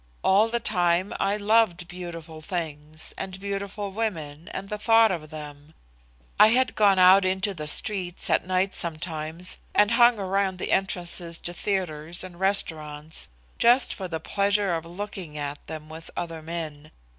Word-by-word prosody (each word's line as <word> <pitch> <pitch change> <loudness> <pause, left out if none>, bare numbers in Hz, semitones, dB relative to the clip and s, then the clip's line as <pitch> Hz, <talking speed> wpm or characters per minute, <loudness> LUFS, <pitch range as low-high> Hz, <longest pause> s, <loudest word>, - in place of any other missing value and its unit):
All 200 +4 +4
the 235 +1 0
time 180 -2 +2
I 200 +1 +1
loved 210 -4 +2
beautiful 170 -3 -8
things, 155 -3 -5
and 190 0 -5
beautiful 200 0 -4
women, 170 -7 -4
and 195 - -6
the 210 +1 -4
thought 225 0 +5
of 155 -4 -5
them. 150 0 -9 0.6
I - - +9
have 255 +3 +2
gone 200 -2 +4
out 185 +1 +7
into 190 +2 0
the 155 -4 -6
streets 180 +2 0
at - - +1
nights 185 +1 0
sometimes 160 +1 -3 0.2
and 210 +1 +5
hung 235 0 +5
around 195 -1 -1
the - - -3
entrances 175 -3 0
to 175 - -2
theatres 175 -4 -2
and 180 -2 -10
restaurants 160 -6 +1 0.3
just 240 +2 +5
for 190 - -6
the 165 -2 -4
pleasure 200 +2 +1
of 165 0 -3
looking 180 -3 -7
at 145 0 -5
them 155 -1 -7
with 160 +1 -9
other 165 -2 -4
men. 155 -2 -6
180 Hz, 155 wpm, -25 LUFS, 160-200 Hz, 0.6 s, I